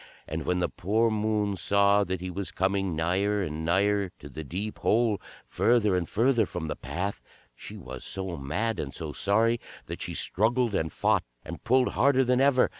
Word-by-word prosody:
And - - -4
when 90 - +2
the 90 -1 +1
poor 110 +7 +1
Moon 105 -1 0
saw 100 +2 +3
that 95 -1 -3
he 90 0 -4
was 95 +2 -4
coming 95 -2 0
nigher 95 +5 +1
and 80 -2 -4
nigher 100 +3 +2
to 70 - -11
the 80 +3 -7
deep 95 +9 -5
hole, 110 -2 +2 0.2
further 110 -5 +2
and 90 -2 -1
further 115 -1 +2
from 85 -2 -5
the 75 - -3
path, 100 +3 -4 0.3
she - - -10
was 65 -1 -8
so 95 -2 -4
mad 95 +11 -2
and 70 -2 -4
so 80 -3 -5
sorry 115 - +2 0.3
that - - -7
she - - -4
struggled 115 +3 +1
and 80 -4 0
fought - - +2 0.2
and - - -8
pulled 125 +1 +3
harder 135 -1 +3
than 125 +1 +2
ever. 135 -2 +4
100 Hz, 190 wpm, -27 LUFS, 90-115 Hz, 0.3 s, ever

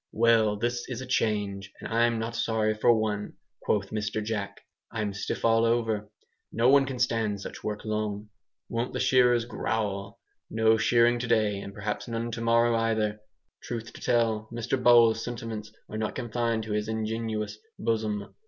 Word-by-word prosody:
"Well, 110 -2 +4
this 120 +3 -2
is 125 -3 -4
a - - -5
change, 100 -5 -1
and - - -6
I'm 115 +1 +2
not 115 +1 -3
sorry 110 -2 +1
for 110 +2 +4
one," 110 -2 0 0.3
quoth 100 -2 0
Mr. 105 0 -2
Jack, 105 -2 -4 0.3
"I'm 105 -3 -2
stiff 100 - -3
all 115 0 +4
over. 115 -3 +1 0.4
No 115 +3 +3
one 135 0 +5
can 130 -1 -4
stand 115 -4 0
such - - -8
work 105 0 -4
long. 105 -1 -2 0.4
Won't 115 +2 -2
the - - -2
shearers 125 -2 +4
growl! 105 -4 -3 0.3
No 110 0 +3
shearing 120 +1 +3
to 125 - -3
day, 110 -3 +2
and 100 - -7
perhaps 105 +1 -4
none 115 0 -3
tomorrow 115 +1 +2
either." 110 -2 0 0.4
Truth 115 -1 -6
to - - -12
tell, 110 -2 +1
Mr 120 +2 -2
Bowles' 115 -2 +6
sentiments 115 -3 -5 0.2
are 110 - -5
not 110 -1 -2
confined 115 -2 -1
to 110 - -6
his 105 0 -1
ingenuous 110 -1 -3 0.2
bosom. 110 -2 -2
110 Hz, 165 wpm, -28 LUFS, 105-115 Hz, 0.4 s, Bowles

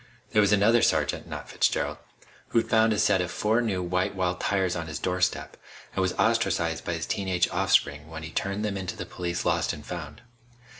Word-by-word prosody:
There 105 - +4
was 105 -1 +3
another 110 +3 +5
sergeant - - +1
not - - -7
Fitzgerald - - 0 0.5
who'd 115 - 0
found 110 0 +5
a 105 - +1
set 95 -3 +3
of 90 - -2
four 110 +5 +1
new 100 -6 -1
white 90 +2 -1
walls 90 -1 0
tires 95 -3 0
on 85 -1 -4
his 75 -1 -4
doorstep, 90 +3 -1 0.4
and 95 - 0
was 95 -1 +1
ostracized 80 -2 +1
by 85 - -2
his 80 -1 -3
teen 100 -2 -2
age 90 -2 +2
offspring 75 +2 +1
when 80 0 -7
he 80 - -7
turned 100 +5 -2
them 100 -2 -2
into 95 -2 -4
the - - -5
police 85 -1 -4
Lost - - +1
and 75 - -9
Found. 80 -3 -7
90 Hz, 205 wpm, -27 LUFS, 85-100 Hz, 0.5 s, another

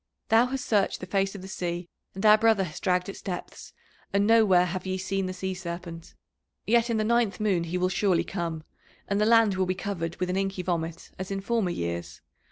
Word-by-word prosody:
Thou 230 +2 +5
hast 260 0 -4
searched 205 -3 +1
the - - -6
face 195 +1 0
of 190 - -8
the - - -7
sea, 175 -2 -4 0.3
and 195 +3 -3
our 210 0 +9
brother 220 -2 +3
has 155 -4 -6
dragged 180 -1 +1
its 195 - -7
depths, 180 -2 -6 0.4
and 200 +1 +2
nowhere 210 -5 +5
have 185 +1 -4
ye 185 0 -1
seen 190 0 -2
the - - -3
Sea 190 +1 -3
Serpent. 170 -2 -7 0.5
Yet 235 +1 +3
in 230 - +1
the 215 - +1
ninth 230 -4 +1
moon 195 -6 +1
he 170 +2 -2
will 180 0 +2
surely 185 -1 +2
come, 170 -4 -4 0.4
and 200 +1 0
the 210 - +3
land 225 -3 +5
will 185 -1 +1
be 185 - 0
covered 175 -4 -4
with 180 0 -2
an 185 - -1
inky 195 -1 -2
vomit 165 -2 -3
as 190 - -4
in 195 0 -2
former 210 -1 0
years. 85 - -4
190 Hz, 220 wpm, -27 LUFS, 180-210 Hz, 0.5 s, our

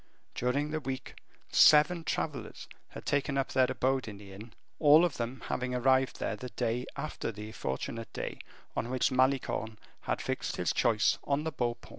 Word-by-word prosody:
During 140 +5 0
the 155 - -1
week, 135 -2 -6 0.3
seven 155 +3 +6
travelers 135 -8 -4 0.2
had - - -10
taken 140 0 0
up 135 - 0
their 130 -1 +3
abode 130 -1 0
in 105 -2 -7
the 100 -1 -12
inn, 110 +3 -11 0.3
all 155 +2 +7
of 170 - -2
them 120 +1 -4
having 125 0 -1
arrived 130 +1 +2
there - - -2
the 125 +4 -7
day 120 +1 -2
after 155 -6 -4
the 105 0 -8
fortunate 110 - -4
day - - -5 0.4
on 115 - -2
which 130 +2 +1
Malicorne 130 -4 +1 0.2
had - - -2
fixed - - -3
his - - 0
choice 110 -3 +2
on 140 +1 0
the 160 - -2
Beau 120 -4 -1
Paon. - - -17
130 Hz, 180 wpm, -31 LUFS, 115-140 Hz, 0.4 s, all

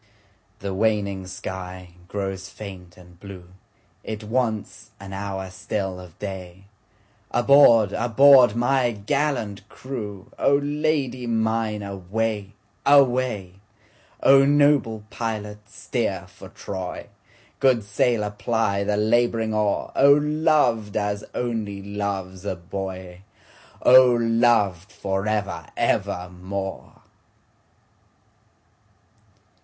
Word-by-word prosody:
The 100 -1 -3
waning 100 -2 0
sky 90 -1 -7 0.2
grows 95 -1 -4
faint 95 -4 -10
and 90 -1 -17
blue, 95 -3 -11 0.5
It 110 0 -6
wants 110 -1 -2
an 95 0 -9
hour 95 -1 -5
still 95 -1 -4
of 90 -3 -13
day, 95 -2 -7 0.7
Aboard! 120 -5 +5
aboard! 120 0 +6
my 120 0 +1
gallant 105 -3 -2
crew,O 115 0 -3
Lady 145 -4 -1
mine 110 -2 -1
away! 100 +2 -3 0.3
away!O 115 -1 +2
noble 140 -6 +3
pilot 105 -2 -5
steer - - -3
for - - -14
Troy, 95 -2 -6 0.5
Good 130 -5 +3
sailor 105 +1 0
ply 105 -1 -1
the 105 +1 0
labouring 115 0 +1
oar,O 105 +6 +3
loved 150 -8 +1
as 105 0 -2
only 110 -5 -3
loves 100 -2 -4
a 100 - -3
boy!O 95 +7 +1
loved 115 -5 +2
for 100 -1 -3
ever 100 -7 -2
evermore! 90 +2 -3
105 Hz, 90 wpm, -23 LUFS, 95-120 Hz, 0.7 s, aboard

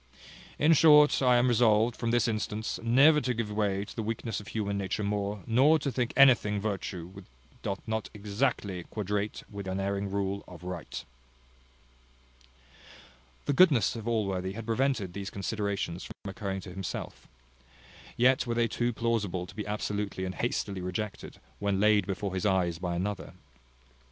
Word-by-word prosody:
In 155 +3 +5
short 150 -2 +6
I 125 -2 +5
am 120 +1 +3
resolved, 115 -1 +3
from 115 - -2
this 120 +1 +2
instance, 110 0 -2
never 140 +7 +5
to 125 -3 -1
give 110 -2 -3
way 100 -1 0
to - - -11
the 115 - -2
weakness 110 0 -3
of 105 - -12
human 100 -2 -2
nature 100 +1 -2
more, 100 -1 -2
nor 135 +7 +5
to 140 -2 -2
think 125 -1 -1
anything 120 -7 +5
virtue 100 -4 -3
which 95 0 -12 0.4
doth 100 - -3
not 110 -1 -2
exactly 105 -2 -2
quadrate 105 0 -3
with 100 -2 -7
the 95 - -2
unerring 100 +1 -2
rule 100 0 -2
of 90 -1 -12
right." 90 -2 -6 2.4
The 145 - +1
goodness 140 - +5
of 115 -1 -6
Allworthy 95 -5 -1
had 115 +2 -7
prevented 115 -5 0
those 100 +1 -5
considerations 100 -3 -3
from 95 - -8
occurring 95 -1 -4
to 90 - -9
himself; 95 -1 -6 0.9
yet 130 +2 +3
were 120 - -1
they 115 0 +2
too 120 +2 -1
plausible 105 -6 -1
to 90 - -13
be 105 0 -5
absolutely 105 -2 -3
and 95 - -4
hastily 100 -4 -2
rejected, 95 +3 -5 0.2
when 100 -1 0
laid 105 -2 +4
before 95 0 -3
his 95 +3 0
eyes 90 -4 +1
by 90 -1 -2
another. 100 +4 -3
105 Hz, 160 wpm, -29 LUFS, 95-115 Hz, 2.4 s, short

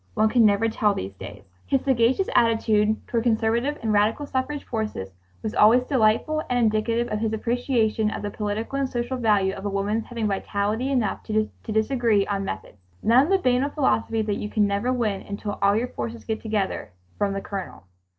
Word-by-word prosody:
One 215 0 +3
can 230 -1 +5
never 205 +2 +2
tell 215 -2 +1
these 95 +1 -5
days." 100 +1 -10 0.2
His 270 - +2
sagacious 265 +6 +2
attitude 220 -2 +3
toward 235 - 0
conservative 235 +5 +1
and 220 -1 +1
radical 215 +7 +2
suffrage 280 +2 -3
forces 215 - -4 0.3
was 215 - -3
always 230 +4 +5
delightful 255 +5 +2
and 250 - +1
indicative 230 +1 +1
of 210 - -2
his 220 0 -1
appreciation 230 -2 0
of 215 - -5
the 205 - -3
political 215 +6 -3
and 270 -1 0
social 240 +1 -2
value 205 -5 +2
of 195 - -8
a 205 - -1
movement's 205 +3 -1
having 230 -2 -3
vitality 205 +4 -1
enough 245 -7 0
to 215 -1 0 0.2
disagree 220 -2 +1
on 200 -1 -2
methods. 95 - -6 0.2
None 245 +5 +5
of - - -5
the 390 - +4
banal 260 -4 +1
philosophy 225 -6 0
that 210 -1 -1
"you 210 - -4
can 210 -1 +2
never 200 +5 0
win 220 -6 -1
until 205 0 -5
all 200 0 +4
your 240 +3 -1
forces 115 - -6
get 220 - -3
together" 210 - -2 0.3
from 200 -1 +1
the 195 - -3
Colonel. 195 - -6
220 Hz, 190 wpm, -24 LUFS, 205-245 Hz, 0.3 s, can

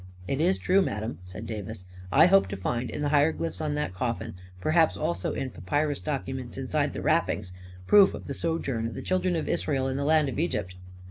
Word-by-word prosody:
" 90 0 -17
It 135 +4 -1
is 185 +3 +3
true, 190 +2 +3
madam," 105 - -3
said 95 +5 -9
Davis. 110 -3 -6 0.2
" 90 0 -15
I - - +10
hope 195 +2 +5
to 100 +1 -5
find, 120 +6 -2
in - - -4
the 145 - +1
hieroglyphs 160 +3 +1
on 150 -1 -1
that 150 -10 -2
coffin 115 +4 -3
— 90 0 -21
perhaps 160 - +3
also 85 +2 -1
in 135 -2 -3
papyrus 145 +10 -1
documents 130 -4 -4
inside - - -1
the - - -5
wrappings 90 0 +1 0.2
— 90 0 -17
proof 200 - +6
of - - -9
the 140 - -4
sojourn 135 -7 -1
of 115 - -7
the - - -6
Children 185 -1 +1
of 160 - -2
Israel 135 -3 0
in 135 0 -2
the 140 - -1
land 155 0 +3
of 135 - -3
Egypt." 105 - -1
135 Hz, 225 wpm, -27 LUFS, 105-155 Hz, 0.2 s, I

